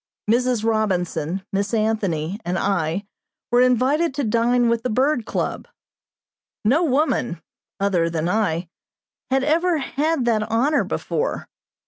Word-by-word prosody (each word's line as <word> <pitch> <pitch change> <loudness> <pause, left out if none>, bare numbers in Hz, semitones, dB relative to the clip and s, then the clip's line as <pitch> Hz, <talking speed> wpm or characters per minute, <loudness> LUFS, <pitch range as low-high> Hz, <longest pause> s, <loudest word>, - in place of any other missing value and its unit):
Mrs. 240 0 +2
Robinson, 190 -5 -1
Miss 200 +3 0
Anthony, 200 -5 -1
and 180 +2 -2
I 190 0 -1 0.5
were 245 +1 +5
invited 260 +5 +2
to 285 - -1
dine 235 +2 +2
with 230 0 +1
the 250 - -2
Bird 255 0 +1
Club. - - -3 1.0
No 280 +11 +4
woman, 260 - +1 0.4
other 185 -4 +1
than 165 0 -2
I, 180 -4 0 0.6
had 265 0 +2
ever 335 +4 +2
had 290 0 -1
that 220 -3 +1
honor 275 +6 +2
before. - - -3
225 Hz, 125 wpm, -22 LUFS, 195-265 Hz, 1.0 s, were